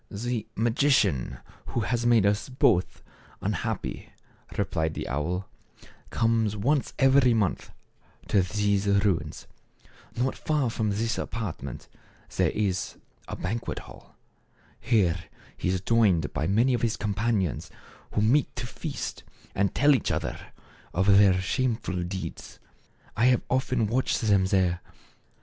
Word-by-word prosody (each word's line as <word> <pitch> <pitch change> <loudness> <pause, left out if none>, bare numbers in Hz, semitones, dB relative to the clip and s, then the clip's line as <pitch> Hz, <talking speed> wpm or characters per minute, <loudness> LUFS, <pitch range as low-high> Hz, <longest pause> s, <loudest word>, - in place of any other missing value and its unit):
" - - -41 0.2
The 120 -3 -2
magician 115 - +2 0.3
who 120 - -1
has 120 +2 0
made 115 -4 +5
us 105 +5 +1
both 105 -8 +1 0.4
un - - -1
happy," - - -4 0.5
replied 80 0 -1
the - - -4
owl, 85 +8 -2 0.6
"comes 115 -2 +1
once 135 +7 0
every 135 -3 +5
month 105 -5 0 0.6
to 100 - +4
these 100 +1 0
ruins. 100 -2 +1 0.7
Not 130 +2 0
far 145 -6 0
from 110 -1 -1
this 115 +3 -1
apart 110 -8 -4
ment 65 -2 -7 0.5
there - - +3
is 100 -1 -2 0.3
a - - -5
banquet 110 +6 -3
hall. - - -12 0.6
Here 90 -7 +1 0.3
he - - -2
is 95 0 +1
joined 95 - +2
by 75 +2 -1
many 115 +7 +3
of 120 - 0
his 115 -1 0
companions 105 -3 -1 0.4
who 105 - +1
meet 130 +7 +2
to - - -4
feast, 140 +4 -5 0.3
and 100 0 0
tell 145 +2 +5
each 130 - 0
other - - -3 0.5
of 95 +2 +2
their 100 -2 +6
shameful 110 -2 -1
deeds. 90 -1 -6 0.6
I 115 - +2
have 125 -2 +3
often 130 -3 +1
watched 120 +5 0
them 100 -4 +3
there. 90 -2 +1
105 Hz, 135 wpm, -27 LUFS, 95-120 Hz, 0.7 s, their